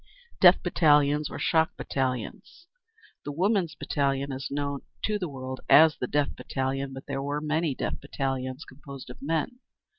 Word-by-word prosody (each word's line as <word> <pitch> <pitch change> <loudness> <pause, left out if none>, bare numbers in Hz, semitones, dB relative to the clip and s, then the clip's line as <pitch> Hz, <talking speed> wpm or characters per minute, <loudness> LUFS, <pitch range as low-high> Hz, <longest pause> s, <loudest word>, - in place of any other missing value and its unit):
Death 180 0 +7
Battalions. 150 -4 +3
Or - - -6
Shock 160 +1 +1
Battalions. 130 - -4 0.6
The 145 - -4
Women's 180 0 +1
Battalion 140 -1 -1
is 135 0 -5
known 140 -1 -2 0.2
to 210 -1 0
the 180 -4 -3
world 130 -1 -6
as 155 0 +7
the 125 - -3
Death 145 +1 0
Battalion, 135 0 -3
but 135 0 -9
there 135 -1 -3
were 145 +1 -2
many 155 -1 0
Death - - -3
Battalions 135 -1 -3
composed 135 -1 -10
of - - -13
men. 165 - -2
140 Hz, 155 wpm, -27 LUFS, 135-160 Hz, 0.6 s, Death